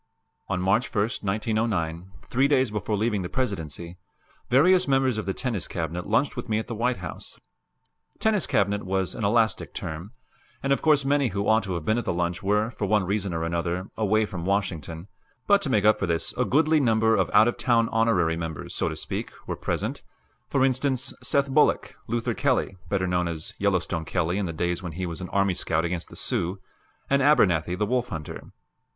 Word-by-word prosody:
On 95 -2 0
March 95 +7 +1
1, 105 - 0 0.2
1909, 95 -4 -1
three 135 +3 +2
days 130 -5 +2
before 105 0 -2
leaving 105 -1 0
the 90 - -4
Presidency, 85 - -4 0.5
various 180 +8 +5
members 135 -4 +2
of 105 - -5
the 95 - 0
Tennis 115 -7 -2
Cabinet 85 +1 -4
lunched 115 +7 +1
with 120 -2 -6
me 105 - +1
at 110 - -2
the 120 - -5
White 120 +2 0
House. 85 -3 -7 0.8
"Tennis 215 -3 +1
Cabinet" 100 +1 +1
was 95 -1 -1
an - - -5
elastic 110 +2 +1
term, 80 +6 -5 0.5
and 135 0 +3
of - - -1
course 150 -3 +4
many 140 -1 +2
who 100 -2 -2
ought 110 +1 +4
to 95 -3 -4
have 85 -3 -5
been 110 +2 +2
at 120 - -5
the - - 0
lunch 85 0 -1
were, 105 +3 +1
for 105 -3 -3
one 105 0 +3
reason 100 0 -1
or 80 -1 -2
another, 85 +2 -2
away 110 0 +2
from 95 -5 -6
Washington; 85 -3 -2 0.4
but, 200 0 +4
to 145 - -2
make 105 -5 +2
up 110 0 +5
for 100 - -1
this, 85 -1 0
a - - +1
goodly 155 +3 +3
number 110 -3 +3
of 95 -3 +1
out 110 +2 +6
of 120 - 0
town 115 -2 +2
honorary 110 -8 +2
members, 80 -2 -5
so - - 0
to - - -5
speak, - - -4 0.2
were - - -3
present - - -3 0.5
for 135 -2 +3
instance, 130 -1 +1
Seth 140 0 +2
Bullock; 150 +2 +2
Luther 115 0 -1
Kelly, 95 - 0
better 95 -1 0
known 90 -1 0
as 80 -2 -4
Yellowstone 90 -4 0
Kelly 90 +2 0
in 100 - -1
the - - -3
days 85 +2 -2
when 85 -3 -6
he 90 +3 -3
was 85 0 -5
an 90 - -6
army 100 -1 +2
scout 85 -1 0
against 85 -1 -3
the - - -12
Sioux; 90 +3 -1 0.5
and 140 0 +2
Abernathy, 90 - +3
the 105 - +1
wolf 125 +2 0
hunter. 80 -3 -6
100 Hz, 205 wpm, -25 LUFS, 90-120 Hz, 0.8 s, out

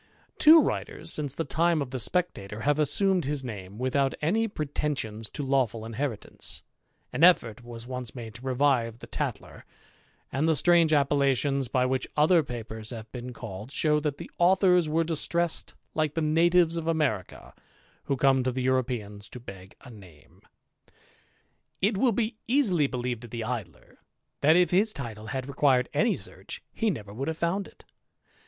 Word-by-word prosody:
Two 315 +2 +9
writers, - - -3
since 145 -3 -2
the 165 - -1
time 170 0 +1
of 140 -3 -3
the 130 - -3
Spectaior^ 110 - -2
have 145 +1 +2
assumed 185 +3 +2
his 145 -1 -2
name, 100 -5 -7
without 135 +2 0
any 215 +9 +1
pretensions 140 - -3
to 145 - -5
lawf^L: 125 -5 0
inheritance; 115 0 -4 0.5
an 135 +6 0
effort 120 - +4
was 120 -1 -9
once 125 -1 -6
made 115 -3 -7
to 115 - -11
revive 130 -3 +1
the - - -11
Tat - - -2
k^ - - -14 0.7
and 140 +5 0
the 160 - +3
strange 170 +2 +4
appellations 140 -2 +2
by 125 +1 +1
which 130 +1 -1
other 160 +3 +5
papers 110 -5 -6
hssiz^t 110 -3 -7
been 125 0 -6
called, 110 0 -8
show 150 0 +2
that 150 -2 -2
the - - -9
authors 180 -2 +4
were 165 +2 +2
distressed 170 +1 -1 0.2
like 155 -1 0
tlie 165 - 0
natives 170 +2 +3
of 165 -1 -4
America, 150 - -2 0.5
who 140 - -1
come 135 0 +3
to 130 - 0
the 130 +1 -3
Europeans 120 -6 -1
to 125 - -8
beg" 95 -5 -11
z - - -10
name. 90 -9 -16 1.4
It 205 +3 +2
will 245 +5 +3
be 220 +1 -1
easily 210 - +3
believed 125 -2 -4
of - - -11
the 115 0 -4
Idler, 110 -9 -6 0.4
that 155 +3 +5
if 180 0 +4
his 210 +4 +3
title 110 -6 -7
had 130 +3 -4
required 135 -2 +2
any 230 0 +2
search, - - -8
he 225 - 0
never 105 - -5
would 135 +6 -4
have 160 0 -2
found 185 +4 -1
it. - - -19
135 Hz, 170 wpm, -27 LUFS, 120-165 Hz, 1.4 s, Two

